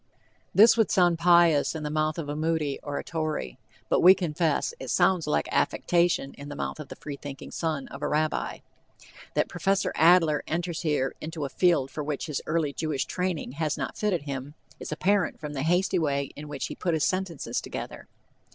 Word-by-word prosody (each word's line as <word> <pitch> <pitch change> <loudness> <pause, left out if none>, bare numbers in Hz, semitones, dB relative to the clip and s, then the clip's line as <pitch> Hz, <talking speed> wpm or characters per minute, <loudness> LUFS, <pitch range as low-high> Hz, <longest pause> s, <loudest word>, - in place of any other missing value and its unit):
This 220 +3 +7
would 225 - +3
sound 175 -4 +3
pious 170 -3 +4
in 155 - -4
the 150 - -3
mouth 155 +1 0
of 160 -3 -4
a 145 - -3
Moody 155 -2 -1
or 145 -1 -4
a - - -3
Torrey, 155 - -3 0.3
but, - - +2
we 185 +2 +8
confess, 165 - 0
it - - -7
sounds 180 -2 +2
like 75 -1 +1
affectation 170 -5 +1
in 140 +1 -8
the 145 - -6
mouth - - -4
of 150 - -7
the - - -9
free 145 -1 -7
thinking 140 -1 -8
son 155 -5 -2
of 140 - -9
a - - 0
rabbi. 155 +1 -1 0.7
That - - +2
Prof. 195 0 0
Adler 165 -3 +5
enters 170 0 -2
here 150 -5 0
into 155 -1 -4
a - - -4
field 165 -5 +2
for 150 - -4
which 145 -1 -3
his 150 -4 -3
early 155 -3 0
Jewish 155 -4 -2
training 180 -7 -2
has 150 +2 -2
not - - -4
fitted 195 -8 0
him, 140 0 -6 0.2
is - - -7
apparent 190 +4 +1
from 150 -1 -6
the 135 - -3
hasty 180 +4 +2
way 140 -3 -1
in 150 +1 -8
which 145 -2 -4
he - - -5
has - - -16
put 175 -3 +1
his 155 - +1
sentences 185 -5 -2
together. - - -7
155 Hz, 205 wpm, -27 LUFS, 145-175 Hz, 0.7 s, we